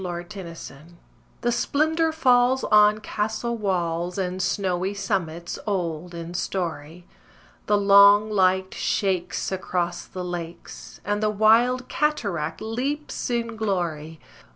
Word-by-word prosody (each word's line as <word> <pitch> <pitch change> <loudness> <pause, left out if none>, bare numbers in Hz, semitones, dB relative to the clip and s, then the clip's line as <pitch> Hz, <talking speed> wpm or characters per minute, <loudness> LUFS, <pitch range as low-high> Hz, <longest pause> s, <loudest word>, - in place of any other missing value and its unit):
UNKNOWN 175 -1 -3
THE - - -9
BUGLE 170 -1 -9
SONG 165 +3 -12 0.4
The 240 - +1
splendour 315 +6 +1
falls 255 -4 +3
on 210 0 +5
castle 220 +2 -2
walls 175 -4 -2
And 185 -1 -2
snowy 185 +1 -1
summits 175 -4 -3
old 175 -3 -3
in 170 +1 -7
story: 170 -2 -4 0.6
The 210 - +3
long 200 +1 +6
light 190 -1 +2
shakes 185 -3 -1
across 180 -2 -2
the 185 -1 -7
lakes, 175 -1 -8
And 205 +1 -1
the 215 - +2
wild 230 +4 +3
cataract 200 - -1
leaps 260 +8 -3
in 235 -1 -2
glory. 170 -7 -3
195 Hz, 125 wpm, -24 LUFS, 175-220 Hz, 0.6 s, long